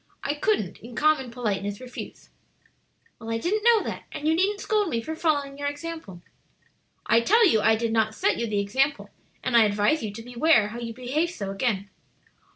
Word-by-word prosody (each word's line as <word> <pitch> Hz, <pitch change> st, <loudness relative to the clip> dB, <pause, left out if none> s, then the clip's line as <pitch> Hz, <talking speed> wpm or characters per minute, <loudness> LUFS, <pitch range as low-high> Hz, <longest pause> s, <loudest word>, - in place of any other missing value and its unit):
I 285 Hz, -, 0 dB
couldn't 295 Hz, -, -1 dB
in 235 Hz, +1 st, -11 dB
common 305 Hz, -4 st, +2 dB
politeness 205 Hz, -4 st, -3 dB
refuse." 250 Hz, -1 st, -9 dB, 0.9 s
"Well, 225 Hz, 0 st, -8 dB
I 225 Hz, -, 0 dB
didn't 410 Hz, -, -1 dB
know 465 Hz, -2 st, +5 dB
that; -, -, -6 dB
and 300 Hz, -, -4 dB
you 320 Hz, -, +4 dB
needn't 395 Hz, +5 st, +1 dB
scold 420 Hz, -2 st, 0 dB
me 235 Hz, -, -1 dB
for 315 Hz, +8 st, -5 dB
following 285 Hz, -4 st, -1 dB
your 285 Hz, -, -2 dB
example." 290 Hz, -, -7 dB, 0.8 s
"I 230 Hz, -, +4 dB
tell 440 Hz, -, +5 dB
you 220 Hz, -10 st, +3 dB
I 220 Hz, -, +4 dB
did 225 Hz, 0 st, -2 dB
not 220 Hz, -1 st, +1 dB
set -, -, +1 dB
you 235 Hz, -, -2 dB
the 210 Hz, -2 st, -2 dB
example; 270 Hz, +8 st, 0 dB, 0.3 s
and 245 Hz, -, 0 dB
I 230 Hz, -, +8 dB
advise 210 Hz, +8 st, +2 dB
you 215 Hz, -, -4 dB
to 225 Hz, +3 st, -9 dB
beware 240 Hz, -2 st, +3 dB
how 235 Hz, +3 st, -7 dB
you 235 Hz, -1 st, -5 dB
behave 270 Hz, +8 st, -1 dB
so 200 Hz, -, -5 dB
again. 200 Hz, -1 st, -1 dB
245 Hz, 195 wpm, -25 LUFS, 220-315 Hz, 0.9 s, I